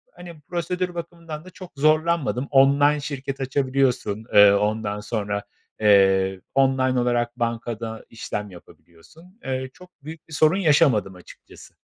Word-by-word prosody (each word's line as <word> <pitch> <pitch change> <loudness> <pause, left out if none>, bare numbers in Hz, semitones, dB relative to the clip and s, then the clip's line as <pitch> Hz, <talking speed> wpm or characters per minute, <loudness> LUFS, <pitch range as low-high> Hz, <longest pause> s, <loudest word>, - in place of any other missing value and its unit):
hani, 170 -3 -11
prosedür 180 +1 -3
bakımından 165 -2 -8
da 185 - -11
çok 185 0 -12
zorlanmadım. 155 -2 +1
Online 140 +2 +4
şirket 135 -1 -5
açabiliyorsun, 130 -5 -1
eee, 105 0 +8
ondan 105 0 -1
sonra, 105 -2 -3 0.4
eee, 95 -2 +3
online 130 -1 +2
olarak 120 0 -1
bankada 115 -1 -4
işlem 105 -2 -6
yapabiliyorsun. 155 - -18
Eee, 130 0 -3
çok 180 0 -16
büyük 155 +1 -10
bir 160 - -13
sorun 155 +4 +3
yaşamadım 145 - +2
açıkçası. 90 - -16
130 Hz, 125 wpm, -23 LUFS, 110-155 Hz, 0.4 s, eee